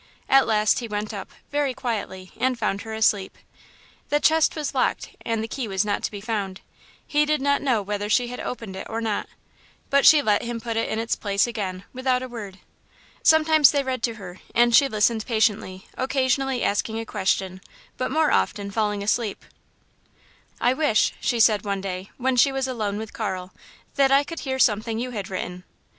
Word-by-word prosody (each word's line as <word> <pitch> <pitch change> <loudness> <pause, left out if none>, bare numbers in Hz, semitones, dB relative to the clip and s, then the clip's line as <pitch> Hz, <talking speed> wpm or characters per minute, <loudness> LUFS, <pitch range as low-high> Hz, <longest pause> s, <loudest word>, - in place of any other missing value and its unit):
At 270 0 +5
last 215 -1 +3
he 240 - -5
went 210 0 -4
up, 200 - -6 0.2
very 285 -3 0
quietly, 200 -6 -4
and 255 -1 0
found 200 -3 -1
her 220 - -7
asleep. 210 -3 +1 0.7
The 295 - +2
chest 320 +1 +3
was 300 -3 -3
locked 260 - 0
and 225 -1 -1
the - - -4
key 245 +1 -4
was 195 0 0
not 205 -1 -1
to - - -1
be 205 - -7
found. 200 -4 -3 0.4
He 295 0 +2
did 305 0 +1
not 280 +1 +1
know 245 -7 +1
whether 205 +1 -3
she 245 +3 +2
had 250 - -7
opened 225 -6 -6
it 190 - -7
or 225 - -3
not, 220 -3 -2 0.6
but 280 0 +4
she 300 -2 +7
let 210 -4 +2
him 235 0 -4
put 230 0 -4
it 225 - 0
in 220 - -2
its 230 +1 -1
place 200 -1 +1
again, 195 -6 -4
without 255 0 0
a - - -5
word. 210 -6 -8 0.6
Sometimes 315 -2 +6
they 285 -1 +1
read 260 -2 -3
to 230 -1 -1
her, 185 -4 -10 0.2
and 240 0 +5
she 280 - +6
listened 220 -1 +1
patiently, 215 -4 0
occasionally 265 0 0
asking 220 +2 0
a 225 - -5
question, 190 -3 -1 0.4
but 255 - -1
more 315 -1 +2
often 200 -1 0
falling 210 -1 -1
asleep. 215 0 -1 1.1
"I 245 - +3
wish," 280 -5 +2
she 240 -3 0
said 215 -2 +4
one 200 -2 -2
day, 190 0 -5
when 260 0 0
she 275 +3 +5
was 270 -1 -1
alone 215 -5 -2
with 220 0 -7
Carl, 190 -4 -4 0.4
"that 275 -1 +5
I 275 +1 +5
could 330 +3 -7
hear 265 -1 -3
something 220 -2 +2
you 250 +2 -3
had 205 -5 -5
written." 180 -1 -5
225 Hz, 195 wpm, -24 LUFS, 205-260 Hz, 1.1 s, she